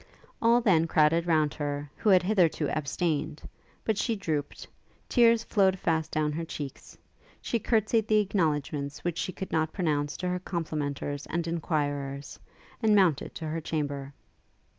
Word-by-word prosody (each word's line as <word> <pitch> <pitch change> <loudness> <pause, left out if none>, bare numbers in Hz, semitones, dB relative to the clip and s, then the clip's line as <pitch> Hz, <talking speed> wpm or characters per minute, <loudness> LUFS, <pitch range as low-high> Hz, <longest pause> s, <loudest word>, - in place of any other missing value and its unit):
All 235 +1 +5
then 170 -8 +3
crowded 165 +2 +3
round 155 -3 +2
her, 145 -1 -3
who 215 - 0
had 185 -2 +6
hitherto 180 -6 +2
abstained; 155 0 -2 0.4
but 220 -2 0
she 230 - 0
drooped; 155 -7 -3 0.4
tears 230 -2 +4
flowed 190 -4 +2
fast 160 -3 0
down 155 -1 0
her 165 +3 -3
cheeks; 145 -4 -7 0.4
she 235 - -1
courtsied 220 0 +1
the 215 - +4
acknowledgements 150 -8 -1
which 175 -1 -2
she - - -2
could 190 +1 -7
not 160 0 0
pronounce 150 -5 -1
to 180 - -3
her 180 0 -1
complimenters 150 -5 -3
and 170 0 -1
enquirers, 145 -4 -2 0.4
and 215 -2 +4
mounted 180 -8 +2
to 160 - -5
her 165 +1 -3
chamber. 145 -3 -3
160 Hz, 150 wpm, -28 LUFS, 150-190 Hz, 0.4 s, had